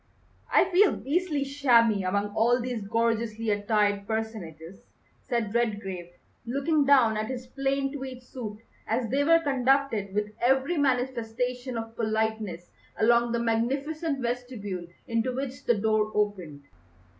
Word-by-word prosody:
"I - - +5
feel 385 +2 +5
beastly 300 0 -1
shabby 240 -7 +3
among 200 +2 -1
all 240 +3 +3
these 245 -2 -3
gorgeously 225 0 0
attired 205 -1 +1
personages," 195 -7 -5 0.4
said 230 -4 -2
Redgrave, 205 -7 -2 0.3
looking 280 +5 +1
down 255 -6 +5
at 215 0 -2
his 255 0 -5
plain 275 +1 -1
tweed 260 -2 -7
suit, 230 -5 -7 0.3
as 230 +2 0
they 280 +2 +2
were 330 +2 +5
conducted 265 -7 +1
with 210 0 -1
every 265 +7 +2
manifestation 250 -1 -1
of 225 0 -6
politeness 220 -5 -2 0.3
along 235 +1 +3
the 235 - 0
magnificent 275 +6 -1
vestibule 235 -7 -4 0.2
into 230 +2 0
which 265 0 -5
the 240 - +3
door 215 0 +1
opened. 185 -9 -2
235 Hz, 130 wpm, -27 LUFS, 215-265 Hz, 0.4 s, I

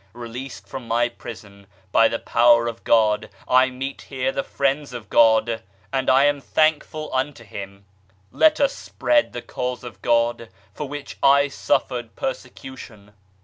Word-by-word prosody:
Released 120 +3 -8
from 130 -3 -8
my 120 +1 +1
prison 100 -4 -11 0.2
by 115 - +5
the 115 - -2
Power 120 0 +4
of 115 -1 -5
God 110 -2 +3 0.2
I 130 +1 +5
meet 135 +2 -6
here 130 -1 -2
the 185 - -2
friends 140 -3 -1
of 115 -4 -9
God, 115 0 +4 0.3
and 130 -1 0
I 130 +1 +5
am 145 -1 +1
thankful 155 +1 0
unto 130 -1 -2
Him. 100 -1 -9 0.5
Let 310 -1 +4
us 280 -1 +2
spread 300 -1 0
the 120 - -7
Cause 125 0 -4
of 120 - -10
God, 115 -1 +1 0.2
for 150 -2 -6
which 145 0 -8
I 140 +1 +5
suffered 120 -3 -1
persecution. 125 -5 -7
125 Hz, 150 wpm, -22 LUFS, 115-135 Hz, 0.5 s, by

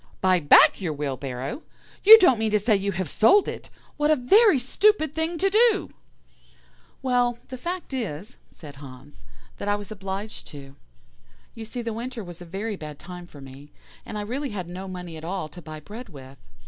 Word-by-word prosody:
"'Buy 185 -1 +3
back 145 +5 +6
your 165 -5 -2
wheelbarrow? 140 - -5 0.4
You 440 +3 +12
don't 350 - +4
mean 220 0 0
to 210 - +3
say 215 +1 +2
you 200 0 -1
have 185 -1 -3
sold 375 - +4
it? - - -7 0.3
What 295 0 +1
a 310 - +5
very 390 - +5
stupid 315 - +2
thing 320 +2 -2
to 390 +3 +1
do!' 440 -1 +3 1.1
"'Well, 245 -2 +1
the 255 - -6
fact 345 -1 -5
is,' 215 - -5
said 145 -3 -13
Hans, 135 - -13 0.3
'that - - -6
I 205 - +2
was 205 -1 -8
obliged 195 +1 -6
to. 140 -2 -12 0.8
You 225 - -8
see 240 +2 -6
the 230 -1 -3
winter 235 0 -6
was 175 -1 -11
a - - -8
very 200 +5 -4
bad 150 -5 -9
time 180 +1 -10
for 145 -4 -14
me, 135 +2 -13 0.3
and 215 - -7
I - - -3
really 260 +7 -4
had 190 -6 -5
no 185 +2 -7
money 180 -3 -7
at 155 - -11
all 180 -1 -4
to 175 +4 -12
buy 155 -1 -9
bread 215 +9 -10
with. 135 -4 -13
205 Hz, 195 wpm, -24 LUFS, 155-255 Hz, 1.1 s, You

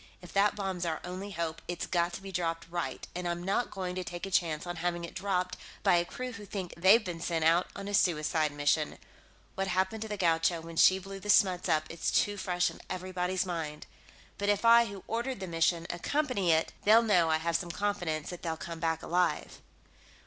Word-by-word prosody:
If 180 - -13
that 200 +1 +3
bomb's 190 -3 -3
our 165 -2 -1
only 185 +3 -6
hope, 165 -3 -3
it's 175 -1 -3
got 175 -1 +1
to 195 - -7
be 195 - -7
dropped 165 -2 -2
right, 170 -7 -3
and 180 0 -3
I'm 175 0 -2
not 200 +6 0
going 185 -2 -4
to 185 0 -3
take 175 +1 -6
a 195 - -7
chance 165 -5 +1
on 175 0 -5
having 175 +1 -2
it 170 - -7
dropped 185 -2 -1 0.3
by 175 - +5
a 170 - +1
crew 255 +7 -5
who 215 -3 -9
think 190 -3 -5
they've 195 +6 +5
been 175 -2 -4
sent 165 -1 -1
out 170 +2 +4
on 200 0 -6
a 205 - -4
suicide 155 -4 +2
mission. 145 +1 0 0.6
What 195 0 -2
happened 190 +4 0
to 220 - -3
the 210 -1 -4
Gaucho 165 -1 +2
when 165 0 -9
she 185 +3 +6
blew 195 +1 -8
the 210 - -8
Smuts 185 -3 +4
up 155 -1 +3
is 165 - -2
too 205 - +2
fresh 180 -2 0
in - - -13
everybody's 185 0 -2
mind. 160 -4 -4 0.5
But 200 0 0
if 205 +2 +1
I, 235 0 +8
who 200 -4 -8
ordered 235 +1 -2
the 190 - -4
mission, 165 0 +1
accompany 200 - 0
it, 160 0 +2
they'll 220 +3 +6
know 180 -7 +3
I 160 - +3
have 165 +1 -1
some 175 +1 -1
confidence 175 -5 -2
that 175 - -8
they'll 165 -2 -3
come 165 0 -7
back 160 -1 -1
alive." 175 0 0
180 Hz, 220 wpm, -30 LUFS, 165-195 Hz, 0.6 s, I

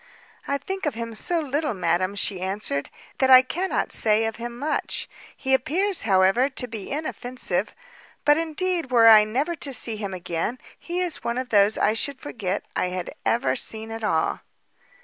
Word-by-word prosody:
"I 280 - 0
think 380 +5 -4
of 280 - -2
him 230 0 -5
so 335 +10 -1
little, 295 -3 -2
madam," 185 +1 0
she 195 -2 -2
answered, 190 -7 -3 0.3
"that 265 - +3
I 255 0 +9
cannot 360 +8 -2
say 220 0 +2
of 225 0 -3
him 235 +1 -6
much; 300 +4 -2 0.3
he 265 0 -1
appears, 350 +9 +2
however, 195 +8 +4
to 260 -2 -5
be 220 -4 -7
inoffensive; 255 -4 -3 0.5
but, 295 - +6
indeed, 330 0 -1
were 235 -2 +5
I 215 -1 +9
never 270 +10 -1
to 280 - 0
see 225 -3 +1
him 200 -3 -4
again, 175 +6 -3 0.2
he 350 +1 -3
is 355 -4 -2
one 235 +1 -2
of 255 -1 -3
those 205 0 +4
I 215 - +2
should 275 +5 -1
forget 205 -9 -4
I - - +1
had 180 -1 -5
ever 235 - +1
seen 220 0 -1
at 225 0 -6
all." 165 -7 0
235 Hz, 180 wpm, -24 LUFS, 210-290 Hz, 0.5 s, I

